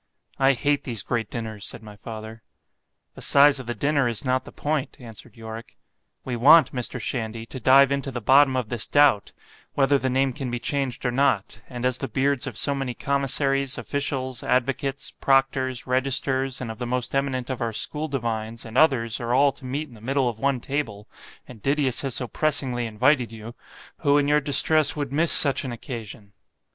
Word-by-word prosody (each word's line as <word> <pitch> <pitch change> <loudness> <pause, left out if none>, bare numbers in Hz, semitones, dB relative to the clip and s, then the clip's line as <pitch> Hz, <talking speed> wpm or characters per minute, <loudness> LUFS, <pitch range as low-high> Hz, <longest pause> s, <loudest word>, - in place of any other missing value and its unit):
I 135 0 +5
hate 145 +3 0
these 115 -6 -4
great 120 -2 -2
dinners——said 110 -2 -6
my 105 -1 -11
father—The 110 +1 -13
size 140 0 +5
of 130 - -9
the 120 - -3
dinner 140 +3 +1
is 115 +2 -3
not 130 0 0
the - - -10
point, 150 -2 -3
answered 115 -1 -12
Yorick——we 115 +2 -10
want, 150 +8 +6
Mr. 125 0 -3
Shandy, 115 -1 -4
to 130 - -8
dive 135 +3 +6
into 140 0 -1
the 125 - -4
bottom 130 +4 +5
of 120 -4 -2
this 120 -3 -2
doubt, 145 -8 +3 0.4
whether 140 0 +3
the 130 - -1
name 135 +1 +1
can 130 0 -4
be 120 - -2
changed 135 0 -3
or 125 - +1
not—and 120 -1 -1
as 125 -1 0
the 135 - -3
beards 140 -1 0
of 115 -5 -6
so 140 - +2
many 135 -3 -3
commissaries, 140 0 0
officials, 130 -3 -3
advocates, 135 +2 -1
proctors, 135 -2 +1
registers, 130 0 0
and 120 -3 -4
of 110 - -10
the 125 - -3
most 125 0 -2
eminent 135 -2 -1
of 130 - -5
our 115 -1 -1
school 150 +7 -2
divines, 115 -5 -4
and 115 +2 -1
others, 120 -8 +2
are 120 0 -1
all 140 +1 +4
to 130 0 -14
meet 140 +4 -3
in 130 - -17
the 110 - -15
middle 135 +2 0
of 115 -2 -4
one 135 0 +1
table, 115 -6 -4 0.4
and 120 -4 -13
Didius 140 -1 +1
has 135 -3 -2
so 125 - -2
pressingly 130 -5 -1
invited 125 +2 +2
you—who 115 +5 -3
in 145 -1 +2
your 150 +1 +3
distress 150 +1 +3
would 145 -2 -4
miss 160 +3 +2
such 140 -3 +3
an 130 - -4
occasion? 110 -4 -8
130 Hz, 185 wpm, -24 LUFS, 115-140 Hz, 0.4 s, want